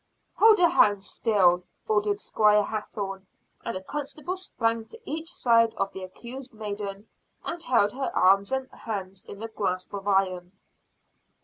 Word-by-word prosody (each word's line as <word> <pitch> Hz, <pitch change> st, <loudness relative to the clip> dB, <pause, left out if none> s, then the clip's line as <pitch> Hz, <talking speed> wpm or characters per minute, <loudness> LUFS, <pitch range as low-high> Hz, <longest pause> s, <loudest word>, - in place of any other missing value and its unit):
"Hold 440 Hz, 0 st, +7 dB
her 355 Hz, -, +6 dB
hands 205 Hz, -7 st, +3 dB
still!" 185 Hz, -6 st, +3 dB, 0.3 s
ordered 210 Hz, -1 st, +1 dB
Squire 210 Hz, 0 st, +3 dB
Hathorne, 200 Hz, -2 st, -5 dB, 0.4 s
and 230 Hz, -, -3 dB
a 190 Hz, -, -9 dB
constable 295 Hz, -, -5 dB
sprang 230 Hz, -11 st, -1 dB
to 460 Hz, -, -12 dB
each 325 Hz, +2 st, -4 dB
side 230 Hz, -8 st, +3 dB
of 195 Hz, 0 st, -2 dB
the 190 Hz, -, -7 dB
accused 245 Hz, +6 st, -8 dB
maiden 205 Hz, -1 st, -6 dB, 0.4 s
and 340 Hz, -, -4 dB
held 235 Hz, -8 st, +3 dB
her 265 Hz, +3 st, -3 dB
arms 195 Hz, +3 st, +4 dB
and 265 Hz, 0 st, -1 dB
hands 195 Hz, -3 st, -6 dB
in 200 Hz, +2 st, -9 dB
a -, -, -3 dB
grasp 190 Hz, -4 st, -3 dB
of 200 Hz, 0 st, -5 dB
iron. 185 Hz, -2 st, +1 dB
210 Hz, 150 wpm, -26 LUFS, 195-245 Hz, 0.4 s, Hold